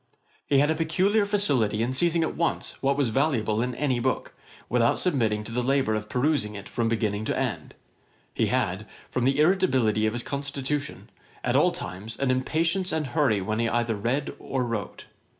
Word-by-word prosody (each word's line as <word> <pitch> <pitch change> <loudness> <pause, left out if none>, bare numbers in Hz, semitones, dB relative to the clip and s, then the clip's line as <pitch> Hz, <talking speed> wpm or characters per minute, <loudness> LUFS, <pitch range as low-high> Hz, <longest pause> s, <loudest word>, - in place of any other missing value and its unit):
He 140 - +3
had 145 +3 +4
a - - +1
peculiar 190 +7 +2
facility 135 - +1
in 125 +2 -1
seizing 165 +4 +2
at 160 - -2
once 170 - -2
what 140 +1 +1
was 140 -5 +2
valuable 115 -4 +1
in 125 0 -2
any 130 -2 0
book, 130 +2 -1 0.3
without 115 0 +2
submitting 115 - +1
to 115 - -7
the 125 +2 0
labour 135 -3 +1
of 105 0 -3
perusing 125 -5 0
it 100 - -8
from 115 -1 -1
beginning 110 -2 -1
to - - -1
end. - - -3 0.6
He - - +1
had, 105 -5 -1 0.2
from 125 - 0
the 135 +2 +2
irritability 135 - +3
of 110 - -1
his 120 0 -4
constitution, 140 +1 -4 0.3
at - - 0
all - - +5
times, 105 +5 -7
an 135 -2 +1
impatience 165 +8 0
and 155 -1 -1
hurry 130 -7 +1
when 110 +4 -2
he 115 0 +1
either 120 -1 0
read 120 +7 -1
or 130 -2 -2
wrote. 115 -4 -4
130 Hz, 185 wpm, -26 LUFS, 110-150 Hz, 0.6 s, all